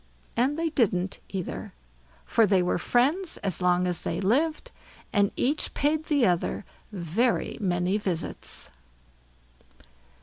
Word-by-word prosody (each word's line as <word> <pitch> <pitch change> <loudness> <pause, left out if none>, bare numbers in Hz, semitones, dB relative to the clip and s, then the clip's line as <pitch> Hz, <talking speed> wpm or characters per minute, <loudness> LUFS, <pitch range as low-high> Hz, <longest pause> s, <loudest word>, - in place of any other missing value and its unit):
And 265 +5 +1
they 330 0 0
didn't 190 - +1
either; 185 - -5 0.5
for 225 -2 +3
they 190 -2 +3
were 180 - 0
friends 295 - +1
as 190 -3 +1
long 180 0 +3
as 180 -2 0
they - - -2
lived, 305 - +1 0.4
and 200 -2 +4
each 290 +5 0
paid 305 +2 +1
the 285 -6 +3
other 180 +2 0 0.3
very 205 +6 0
many 180 +1 +1
visits. 180 -5 -4
205 Hz, 125 wpm, -27 LUFS, 180-285 Hz, 0.5 s, and